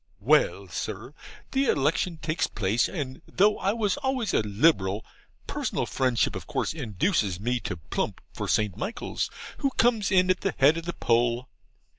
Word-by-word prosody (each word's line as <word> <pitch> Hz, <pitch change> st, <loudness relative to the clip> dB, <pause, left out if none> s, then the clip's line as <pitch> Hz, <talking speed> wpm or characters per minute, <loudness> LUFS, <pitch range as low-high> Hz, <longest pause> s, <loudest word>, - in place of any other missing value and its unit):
Well, -, -, +3 dB
Sir, -, -, -5 dB, 0.4 s
the 270 Hz, +1 st, +2 dB
election 160 Hz, -, +1 dB
takes 155 Hz, +1 st, -1 dB
place, 105 Hz, +3 st, 0 dB
and 140 Hz, -6 st, -5 dB
though 210 Hz, +2 st, +3 dB
I 195 Hz, -, +1 dB
was 220 Hz, +1 st, 0 dB
always 265 Hz, -5 st, -1 dB
a -, -, +4 dB
Liberal, 105 Hz, -2 st, +2 dB, 0.4 s
personal -, -, -2 dB
friendship 130 Hz, -3 st, +1 dB
of -, -, -7 dB
course -, -, -1 dB
induces 110 Hz, -, 0 dB
me 120 Hz, +4 st, 0 dB
to 90 Hz, -, -4 dB
plump 80 Hz, -, -3 dB
for -, -, -4 dB
St. 105 Hz, -4 st, +1 dB
Michaels, 195 Hz, -, -3 dB, 0.3 s
who 275 Hz, -, +2 dB
comes 230 Hz, -4 st, +3 dB
in 185 Hz, -1 st, +5 dB
at 185 Hz, -, -1 dB
the 195 Hz, -, -1 dB
head 145 Hz, +4 st, +5 dB
of 165 Hz, -, -5 dB
the 175 Hz, -, -3 dB
poll. 120 Hz, +1 st, +1 dB
150 Hz, 165 wpm, -27 LUFS, -, 0.4 s, in